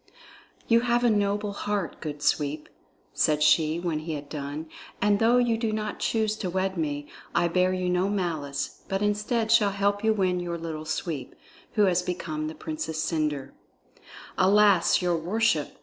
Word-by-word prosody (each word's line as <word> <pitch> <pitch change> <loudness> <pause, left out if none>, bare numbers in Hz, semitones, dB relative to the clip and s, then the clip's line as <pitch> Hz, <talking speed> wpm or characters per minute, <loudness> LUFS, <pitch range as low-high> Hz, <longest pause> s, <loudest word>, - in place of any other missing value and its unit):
"You 230 0 +5
have 240 0 +1
a 240 - +4
noble 205 0 0
heart, 200 -3 -3
good 150 -1 -5
Sweep," 150 0 0 0.4
said 150 -1 +2
she 155 +1 +3
when 170 -3 -2
he 160 +1 -5
had 145 -1 -6
done, 150 +1 -5 0.3
"and 205 0 +3
though 230 +2 +4
you 235 -2 +2
do 225 -2 0
not 215 -1 -3
choose 220 -2 0
to 185 - -3
wed 190 +1 -1
me, 145 -3 -3 0.3
I 175 - +3
bear 180 +2 +2
you 185 -1 -1
no 180 +2 +1
malice, 160 -8 -3
but 195 +1 -1
instead 210 +2 0
shall 220 -3 +5
help 200 +1 0
you 220 - +4
win 185 -4 +1
your 175 -1 -3
Little 160 -2 -6
Sweep, 155 -3 -4 0.4
who 210 - +3
has 180 -2 +2
become 165 -4 -3
the 160 - -6
Princess 160 0 -4
Cendre." 150 -4 -1 0.9
"Alas, 195 -2 +4
your 175 -1 +2
worship!" 175 -2 0
180 Hz, 170 wpm, -26 LUFS, 155-210 Hz, 0.9 s, You